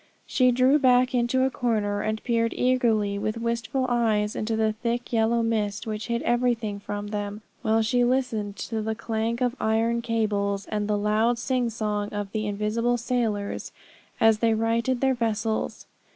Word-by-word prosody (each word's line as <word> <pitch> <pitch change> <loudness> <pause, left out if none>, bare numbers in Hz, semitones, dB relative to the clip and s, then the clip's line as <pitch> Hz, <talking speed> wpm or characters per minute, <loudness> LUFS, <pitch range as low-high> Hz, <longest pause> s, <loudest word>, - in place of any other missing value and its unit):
She 255 -1 +3
drew 255 +4 +4
back 250 -1 +4
into 245 +1 +2
a 265 - +1
corner, 210 -5 0
and 215 0 -2
peered 230 -2 0
eagerly, 225 -5 +1
with 215 +2 -2
wistful 235 +3 -1
eyes, 220 -4 +1
into 220 +1 -1
the 220 -1 +1
thick 235 +2 -3
yellow 230 +1 +2
mist 210 -3 -1
which 215 0 -4
hid 235 -1 -1
everything 240 -4 0
from 205 0 -5
them, 205 0 -4 0.2
while 220 +1 +2
she 245 +3 +2
listened 240 -5 0
to 220 +2 -4
the 220 +1 -2
clank 230 +1 -2
of 250 0 +1
iron 225 +2 +1
cables, 205 -3 -1
and 210 -1 -2
the 210 -1 +1
loud 215 +3 +2
sing 250 0 0
song 210 -2 -2
of 205 -1 -5
the 215 -1 -2
invisible 215 +4 0
sailors 225 -4 -2 0.5
as 225 -2 +4
they 225 -1 +3
righted 230 +3 0
their 265 -1 +3
vessels. 225 -2 -2
225 Hz, 165 wpm, -25 LUFS, 210-240 Hz, 0.5 s, drew